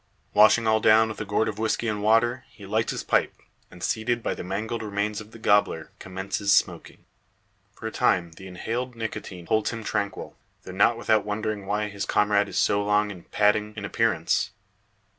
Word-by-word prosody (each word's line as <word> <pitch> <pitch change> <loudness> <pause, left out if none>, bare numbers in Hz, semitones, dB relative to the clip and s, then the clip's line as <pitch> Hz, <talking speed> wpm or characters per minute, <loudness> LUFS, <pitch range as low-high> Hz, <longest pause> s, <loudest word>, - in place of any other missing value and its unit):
Washing 110 +2 +6
all 110 0 +3
down 110 +1 +5
with 110 - -6
a - - -3
gourd 105 +2 0
of 110 -1 -4
whisky 110 +1 0
and 105 -2 -2
water, 115 +4 +2
he 100 - -14
lights 110 +3 0
his - - -4
pipe; - - +1 0.3
and, - - -12
seated 115 +1 -1
by - - -1
the - - -7
mangled 110 +5 -3
remains 105 0 -2
of 105 - -12
the 115 - -13
gobbler, 100 -7 +1
commences 95 +2 -3
smoking. 95 - 0 0.7
For - - -11
a - - -2
time 85 -2 +1
the 95 +4 -12
inhaled 120 +7 -4
nicotine 100 -6 -6
holds 110 +3 +1
him 115 -1 -6
tranquil; 100 -1 -3 0.3
though 95 - -9
not 100 +5 +3
without 110 -3 +2
wondering 105 -1 -3
why 105 +1 0
his 100 -1 -5
comrade 105 -1 +2
is - - -5
so 100 0 +2
long 105 0 +1
in 90 -4 -11
patting 105 0 +1
in - - -25
an 105 - -4
appearance. 105 -8 +1
105 Hz, 195 wpm, -25 LUFS, 100-110 Hz, 0.7 s, Washing